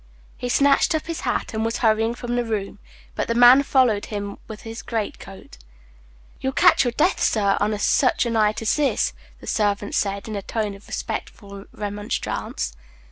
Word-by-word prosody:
He 245 - -5
snatched 280 +5 +3
up 310 - -2
his 330 -1 -4
hat, 245 - -2
and 220 0 -1
was 230 0 -1
hurrying 225 0 +2
from 240 0 -4
the 245 - +1
room; 215 -4 -4 0.3
but - - -2
the 230 - -1
man 245 +3 +8
followed 255 -7 +2
him 200 -1 -5
with 220 -1 -9
his 225 0 -7
great 225 -3 -3
coat. 195 - -13 0.8
"You'll 265 0 -2
catch - - +5
your 245 -2 -1
death, 315 +9 +1
sir, 200 -3 +2
on 210 +1 0
such 255 +5 +2
a 235 - -1
night 215 -1 +1
as 220 - +1
this," 290 -2 +1 0.3
the - - -11
servant 205 -1 0
said, 200 0 -1
in 215 - -5
a 200 - -3
tone 210 0 -3
of 200 +1 -14
respectful 200 -1 -6
remonstrance. 205 - -4
220 Hz, 185 wpm, -23 LUFS, 205-245 Hz, 0.8 s, man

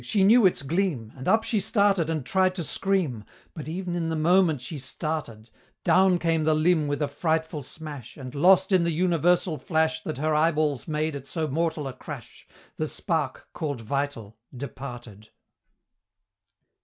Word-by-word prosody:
she 205 -3 +1
knew 220 +1 +7
its 175 - -2
gleam! 145 - -1
And 130 -1 -8
up 220 0 +4
she 225 -2 0
started 200 -4 +2
and 155 -5 -2
tried 185 +3 +2
to 175 - -1
scream, 165 - 0 0.3
But 155 - -7
ev'n 175 +1 -3
in 165 -2 -1
the 160 - -1
moment 165 -1 +3
she 140 +5 -6
started 130 -4 -5 0.3
Down 185 -1 +4
came 165 -2 +1
the 155 0 +3
limb 155 -1 +2
with 145 +1 -1
a - - +1
frightful 160 +1 -1
smash, 145 -3 -9
And, 130 -3 -8
lost 185 +6 +4
in 185 -2 +4
the 170 - +1
universal 175 -1 +2
flash 160 +1 0
That 155 -3 -5
her 155 +2 0
eyeballs 150 -3 +1
made 155 -1 -1
at 140 -1 -7
so 160 -2 -2
mortal 155 0 -1
a 130 - -5
crash, 130 - -10 0.3
The 155 - -1
Spark, 155 -5 -3
call'd 145 -7 -3
Vital, 115 -3 -3 0.2
departed! 120 -6 -8
155 Hz, 170 wpm, -26 LUFS, 140-175 Hz, 0.3 s, knew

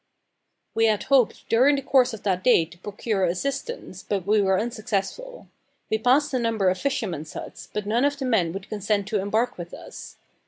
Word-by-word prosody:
We 225 0 +3
had 215 -2 +1
hoped 260 -5 +2
during 260 +5 +4
the 275 - -3
course 255 -2 +4
of 220 -3 -8
that 185 -2 0
day 175 -10 +5
to 170 +1 -16
procure 205 +1 -2
assistance, 275 - -3
but 195 -4 -3
we 210 +1 +3
were 190 -1 +2
unsuccessful. 235 - -3 0.4
We 220 - +2
passed 270 +6 +3
a 255 - +2
number 225 -5 +1
of 185 0 -1
fishermen's 165 - -2
huts, - - -8
but 210 -1 -3
none 230 +5 +1
of 285 0 +1
the 270 - -3
men 195 -10 +2
would 195 +1 -7
consent 205 -1 -1
to 215 - +1
embark 215 +2 0
with 175 0 -7
us. - - -10
215 Hz, 195 wpm, -25 LUFS, 195-255 Hz, 0.4 s, day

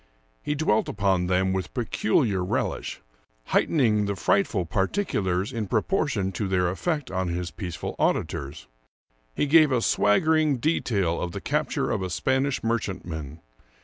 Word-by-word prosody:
He 150 - -2
dwelt 140 -8 +1
upon 95 -4 +1
them 95 +1 +1
with 95 -2 -4
peculiar 110 -4 +1
relish, 90 - -2 0.5
heightening 110 -9 +2
the 100 - -1
frightful 110 - +1
particulars 95 - -1
in 110 -4 -3
proportion 110 - 0
to 100 +2 -3
their 90 -2 +1
effect 150 - -2
on 95 -1 -1
his 85 0 -3
peaceful 90 -7 -5
auditors. 70 +2 -1 0.7
He - - +1
gave 155 0 +5
a 125 - +3
swaggering 155 +7 +3
detail 105 - 0
of 90 - -3
the - - -4
cap - - -1
ture - - -1
of - - -1
a 95 - -3
Spanish 130 +8 0
merchantman. 85 -9 -3
100 Hz, 145 wpm, -25 LUFS, 90-130 Hz, 0.7 s, gave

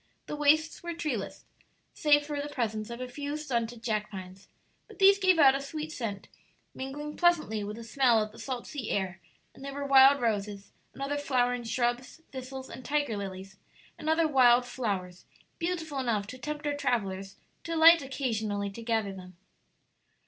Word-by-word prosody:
The - - -5
wastes 305 +2 +2
were 345 -1 -5
treeless, 265 -12 -4 0.5
save 290 -1 +3
for 290 -1 -3
the 290 - -5
presence 220 -5 -3
of 235 +1 -7
a 255 - -4
few 285 +3 -4
stunted 240 -6 -3
jack 215 -3 -1
pines; 190 -1 -10 0.4
but - - -15
these 395 0 +6
gave 375 -3 +4
out 275 -4 +7
a 275 - -2
sweet 305 +3 -5
scent, 215 -8 -5 0.5
mingling 295 +3 -6
pleasantly 310 - +2
with 210 +1 -5
the 230 - -9
smell 240 0 +3
of 215 0 -2
the 225 - -14
salt 245 +1 -4
sea 265 -7 -6
air; 190 -2 -2 0.3
and - - -14
there 275 0 -6
were 285 0 -3
wild 275 0 +7
roses 205 -4 -2 0.2
and 275 - -6
other 290 +1 -1
flowering 245 -3 0
shrubs, 240 +4 -1
thistles 265 0 -7
and 255 - -10
tiger 285 -4 0
lilies 195 -1 -7 0.4
and 310 - -4
other 320 0 +3
wild 250 -4 +5
flowers, 200 -8 -4 0.3
beautiful 330 -5 -2
enough 225 -6 0
to 255 +5 -9
tempt 300 +3 -5
our 290 - 0
travellers 195 -8 -2 0.3
to 335 0 -3
alight 330 +1 +8
occasionally 220 -7 -2
to 230 - -9
gather 225 -3 -1
them. 180 -2 -12
255 Hz, 180 wpm, -29 LUFS, 215-290 Hz, 0.5 s, alight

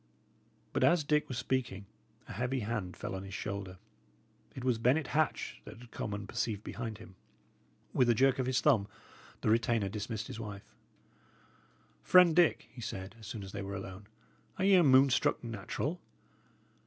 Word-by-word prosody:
But - - +1
as 170 -2 +4
Dick 150 0 +1
was 130 - -4
speaking, 120 -7 -2 0.4
a - - -7
heavy 125 +1 -1
hand 105 -4 -3
fell - - -5
on 95 - -4
his 95 0 -8
shoulder. 100 -2 -5 0.8
It 130 - -6
was 125 -3 +1
Bennet 135 +6 +2
Hatch 155 0 0
that - - -11
had 120 -1 -14
come 105 - -4
unperceived 105 0 -3
behind 115 -3 -5
him. 110 -3 -13 0.8
With 125 -2 +3
a 120 - +5
jerk 135 +2 +3
of 130 - 0
his 130 0 +1
thumb, 115 -10 +3 0.5
the - - +2
retainer 115 -2 +2
dismissed 105 +1 -4
his - - -7
wife. 105 -3 -8 1.3
"Friend 180 -3 +6
Dick," 175 -2 +3
he 120 - -10
said, 95 -1 -6
as 110 - -11
soon 110 -3 -6
as 95 - -8
they 100 - -5
were 100 0 -5
alone, 95 +1 -8 0.5
"are 190 - 0
ye 200 - +5
a 180 -2 +7
moon 135 -1 +6
struck 125 - +1
natural? 115 - -4
115 Hz, 175 wpm, -32 LUFS, 100-130 Hz, 1.3 s, a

